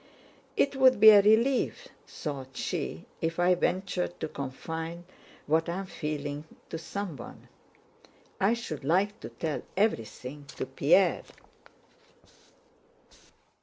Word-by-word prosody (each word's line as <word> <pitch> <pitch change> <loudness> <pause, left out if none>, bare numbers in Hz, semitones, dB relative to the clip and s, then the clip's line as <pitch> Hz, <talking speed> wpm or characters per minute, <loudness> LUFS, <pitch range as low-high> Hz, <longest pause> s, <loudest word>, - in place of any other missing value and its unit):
"It 280 0 +2
would 260 -3 +5
be 220 +1 +11
a 205 -1 +8
relief," 245 - +2 0.2
thought 135 -4 -6
she, - - -3 0.2
"if 165 0 -1
I 180 +1 +5
ventured 180 0 -1
to 160 - -1
confide 160 +5 -5 0.4
what 160 +3 +1
I 170 - -2
am 195 - -4
feeling 150 -3 -4 0.3
to 165 - -4
someone. 170 -7 -7 0.9
I 205 +5 +3
should 155 -12 -6
like 195 +8 +1
to - - -8
tell 155 -3 -3 0.2
everything 145 - -1
to - - -2
Pierre. - - +3
170 Hz, 115 wpm, -29 LUFS, 150-205 Hz, 0.9 s, be